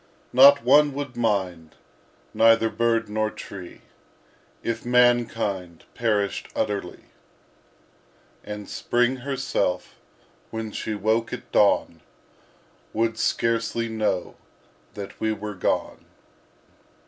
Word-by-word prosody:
Not 140 +1 +8
one 145 +3 +5
would 140 -3 -5
mind, 95 -8 -1 0.6
neither 115 0 +4
bird 115 -1 +1
nor 110 +1 -1
tree 95 -4 -10 0.8
If 115 0 -3
mankind 115 -8 +1
perished 105 -4 -1
utterly; 100 -4 -3 1.4
And 105 -1 -7
Spring 125 +2 0
herself, 135 -8 -2 0.5
when 110 -1 -5
she 110 +1 -4
woke 110 +3 0
at - - -8
dawn, - - +2 0.9
Would 115 0 0
scarcely 115 0 0
know 105 -5 -2 0.6
that 100 -1 -8
we 110 - +1
were 105 0 -6
gone. 90 - -2
115 Hz, 95 wpm, -24 LUFS, 105-120 Hz, 1.4 s, Not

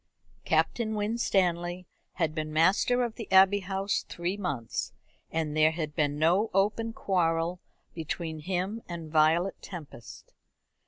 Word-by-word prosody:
Captain 220 -2 +1
Winstanley 185 -5 0 0.3
had 165 -4 -1
been 155 -1 -3
master 190 +10 +3
of 235 -2 -4
the 225 -5 -8
Abbey 190 +1 +6
House 195 +1 -2
three 175 +3 -2
months, 145 - -3 0.4
and 160 -2 -2
there 155 0 +5
had 155 -2 -4
been 145 -1 0
no 180 +8 +3
open 210 +3 +1
quarrel 175 -4 0 0.3
between 160 0 -4
him 185 +7 -2
and 165 -3 -6
Violet 160 +4 +3
Tempest. 155 - -10
175 Hz, 125 wpm, -28 LUFS, 160-200 Hz, 0.4 s, Abbey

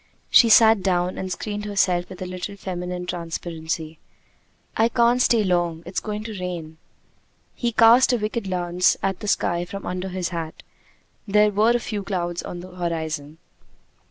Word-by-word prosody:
She 235 - +7
sat 220 -2 +7
down, 180 -1 0
and 185 -1 -4
screened 210 +2 -4
herself 185 -4 +1
with 185 -1 -7
a - - -5
little 185 +2 -6
feminine 180 -1 -5
transparency. 165 -2 -5 0.8
"I 225 +1 +3
can't 240 +1 +3
stay 230 -3 +3
long: 175 -3 0
it's 180 +2 -3
going 210 0 -5
to 215 -3 -7
rain!" 165 -3 -6 0.7
He 240 -1 -2
cast 230 +3 +6
a 245 - +2
wicked 215 0 -3
glance 180 -1 +1
at 195 -1 -1
the 210 - -6
sky 175 -3 +1
from 195 +3 -8
under 185 +1 -4
his 185 -2 -3
hat; 165 -3 -6 0.6
there 210 +1 +4
were 215 +4 +3
a - - +2
few 210 -3 -4
clouds 175 -3 -3
on 175 - -7
the 185 - -10
horizon. 160 -4 -4
185 Hz, 165 wpm, -23 LUFS, 175-210 Hz, 0.8 s, She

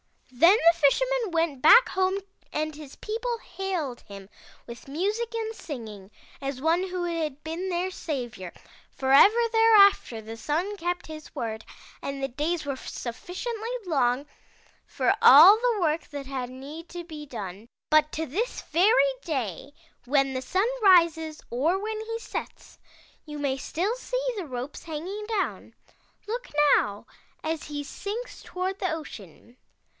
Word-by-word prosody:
"Then 335 - +6 0.2
the 340 - -16
Fisherman 485 - +2
went 325 -5 0
back 470 - +8
home 375 0 +1 0.4
and 310 0 -2
his 295 -2 -11
people 470 +2 -3
hailed 360 - -4
him 195 -2 -12 0.4
with 235 +2 -11
music 415 +11 -2
and 445 -1 -3
singing, 220 - -8 0.3
as 275 -1 -4
one 335 +5 +2
who 365 -1 -3
had 315 -4 -3
been 335 +4 -4
their 360 +1 -1
savior, 245 - -5 0.4
for 265 0 -2
ever 405 +12 +7
thereafter 420 - +5
the 225 +1 -9
Sun 340 - -2
kept 350 -1 -3
his 310 -1 -10
word 220 -1 -4 0.4
and 275 0 -5
the 270 - -1
days 305 +5 -2
were 280 - -2
suffi 260 +6 -7
ciently 470 0 -4
long 270 -5 +1 0.6
for 385 - +1
all 395 -2 +10
the 465 -3 0
work 315 -1 0
that 285 -2 -7
had 260 -2 -4
need 285 +6 -9
to 350 -1 -7
be 305 -3 -9
done. 205 -3 -7 0.2
"But 310 0 +4
to 320 - -2
this 415 - -3
very 460 +10 +3
day 265 - -4 0.3
when 275 0 +2
the 255 - -2
Sun 375 - 0
rises 335 -5 +4
or 300 +10 +1
when 430 +2 -4
he 455 +1 -4
sets, - - -7 0.5
you 300 -1 -7
may 280 -2 -1
still 370 - -2
see - - -3
the 380 - -4
ropes 255 +1 -6
hanging 360 +7 -5
down. 435 -4 -3 0.5
Look 480 +4 -4 0.3
now, 205 0 -3 0.4
as 315 -1 -3
he 290 -1 -5
sinks 420 - -6
toward 375 +2 -4
the 370 -3 -1
ocean! 240 - -9
320 Hz, 150 wpm, -26 LUFS, 270-400 Hz, 0.6 s, all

